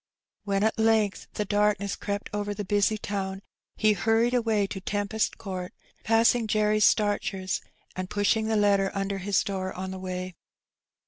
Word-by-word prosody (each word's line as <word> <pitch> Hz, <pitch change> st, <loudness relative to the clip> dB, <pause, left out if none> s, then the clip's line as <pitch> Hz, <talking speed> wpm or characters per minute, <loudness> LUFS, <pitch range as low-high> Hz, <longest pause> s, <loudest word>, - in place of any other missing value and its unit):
When 200 Hz, 0 st, +1 dB
at 220 Hz, +1 st, +1 dB
length 220 Hz, -2 st, +2 dB
the 210 Hz, -, -1 dB
darkness 205 Hz, -1 st, +1 dB
crept 205 Hz, 0 st, -4 dB
over 205 Hz, 0 st, -2 dB
the 205 Hz, -, -4 dB
busy 205 Hz, +2 st, +2 dB
town, 195 Hz, -2 st, -4 dB, 0.3 s
he 215 Hz, -1 st, +3 dB
hurried 225 Hz, +5 st, +2 dB
away 225 Hz, -4 st, +2 dB
to 195 Hz, -1 st, -6 dB
Tempest 205 Hz, +2 st, -1 dB
Court, 185 Hz, -3 st, -6 dB, 0.3 s
passing 225 Hz, +1 st, +3 dB
Jerry 215 Hz, 0 st, +2 dB
Starcher's, 205 Hz, -3 st, +1 dB, 0.3 s
and 185 Hz, 0 st, -4 dB
pushing 215 Hz, +2 st, +1 dB
the 220 Hz, -, +1 dB
letter 200 Hz, -2 st, +3 dB
under 195 Hz, 0 st, -2 dB
his 195 Hz, +1 st, +1 dB
door 190 Hz, -1 st, -3 dB
on 185 Hz, +1 st, -5 dB
the 190 Hz, -, -6 dB
way. 185 Hz, 0 st, -5 dB
205 Hz, 155 wpm, -27 LUFS, 195-215 Hz, 0.3 s, he